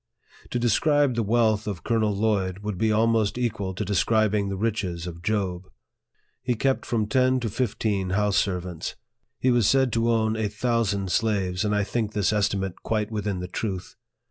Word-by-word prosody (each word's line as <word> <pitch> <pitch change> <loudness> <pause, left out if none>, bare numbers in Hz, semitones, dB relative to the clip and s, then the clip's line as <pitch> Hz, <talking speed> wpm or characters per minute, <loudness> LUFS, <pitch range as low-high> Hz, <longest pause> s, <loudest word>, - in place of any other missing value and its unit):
To - - -2
describe 140 +4 +3
the 115 - 0
wealth 110 -1 +2
of 100 -5 -4
Colonel 110 -3 +1
Lloyd 100 -3 0
would 105 -4 -4
be 110 -1 +2
almost 110 0 +2
equal 105 -6 -2
to 105 - -3
describing 105 +1 +2
the 100 - -2
riches 95 -5 -2
of 85 -1 -7
Job. 95 -2 -2 0.7
He 125 -1 0
kept 135 +4 0
from 115 -3 0
ten 130 +3 +2
to 115 -3 -2
fifteen 105 -5 -1
house 105 +1 +1
servants. 90 -4 -2 0.4
He 130 - +3
was 120 -4 +3
said 130 -2 +3
to 115 0 +1
own 110 -1 +2
a 110 -2 -1
thousand 105 -4 0
slaves, 100 -4 0
and 105 0 +1
I 105 - +2
think 110 0 -2
this 105 -1 +1
^stimate 100 -3 0
quite 110 -1 -1
within 105 -3 -2
the 90 - -4
truth. 95 -1 -4
105 Hz, 175 wpm, -25 LUFS, 100-115 Hz, 0.7 s, describe